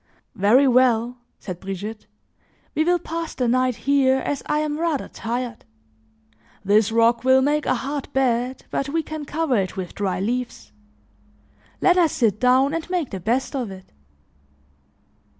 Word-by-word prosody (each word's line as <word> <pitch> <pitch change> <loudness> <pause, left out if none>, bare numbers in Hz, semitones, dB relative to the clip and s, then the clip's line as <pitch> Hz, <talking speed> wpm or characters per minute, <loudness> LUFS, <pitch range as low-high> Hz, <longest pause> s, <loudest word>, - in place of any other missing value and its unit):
"Very 235 +8 +4
well," 245 -1 +3 0.2
said 180 -3 -7
Brigitte, 200 +3 -6 0.7
"we 310 - +1
will 350 +2 +3
pass 330 0 -5
the 250 - 0
night 255 +1 +2
here 270 0 +2
as 275 +1 -3
I 300 - +1
am 300 0 -1
rather 325 -5 -1
tired. 240 +1 -5 1.0
This 210 +2 +3
rock 230 +1 +3
will 260 0 +5
make 295 +2 0
a - - +2
hard 280 0 -4
bed 255 -1 0
but 275 - -2
we 325 +2 -1
can 310 0 -6
cover 295 -3 0
it 190 -1 -2
with 185 -2 -5
dry 190 -3 -2
leaves. 230 - -3 1.1
Let 365 0 +4
us 330 -4 +3
sit 215 -4 +1
down 260 +3 +3
and 330 +1 -4
make 355 -6 -2
the 190 - -4
best 240 +9 -1
of 250 -5 -2
it." 190 -1 -12
255 Hz, 155 wpm, -22 LUFS, 225-290 Hz, 1.1 s, will